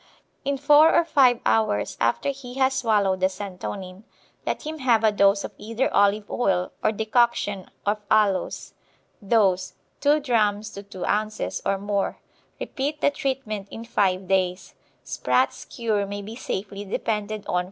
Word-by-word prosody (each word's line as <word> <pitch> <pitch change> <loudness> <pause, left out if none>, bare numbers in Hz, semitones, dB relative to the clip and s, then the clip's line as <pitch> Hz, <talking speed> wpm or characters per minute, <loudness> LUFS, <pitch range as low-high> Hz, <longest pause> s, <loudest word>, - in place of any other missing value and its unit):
In 280 0 -1
four 295 +3 +6
or 340 - +4
five 260 -7 +4
hours 110 -2 +1
after 120 - +1
he 265 -3 -7
has 265 0 +2
swallowed 210 -7 +1
the 185 0 +3
santonin, 190 0 -7 0.4
let - - -2
him 310 0 -5
have 235 -4 +3
a 220 - +5
dose 200 0 +3
of - - -5
either 230 +4 -2
olive 205 +1 +3
oil 185 -6 0
or - - +3
decoction 220 -3 0 0.2
of 210 +1 0
aloes. 210 -3 +1 0.5
Dose, 195 -3 +2 0.2
2 295 +1 +3
drachms 215 -5 +1
to 200 - -8
2 195 -3 -7
ounces 215 +1 -1
or 195 - +1
more. 200 0 -2 0.4
Repeat 290 +1 -3
the 285 - +4
treatment 255 -8 -3
in 230 - -8
five 190 -5 0
days. 185 -1 0 0.3
Spratts' - - 0
cure 215 -4 -1
may 205 0 -5
be 220 +3 -8
safely 200 -4 -5
depended 210 +1 -2
on - - -24
for - - -4
worms. 180 - +3
210 Hz, 160 wpm, -24 LUFS, 195-245 Hz, 0.5 s, four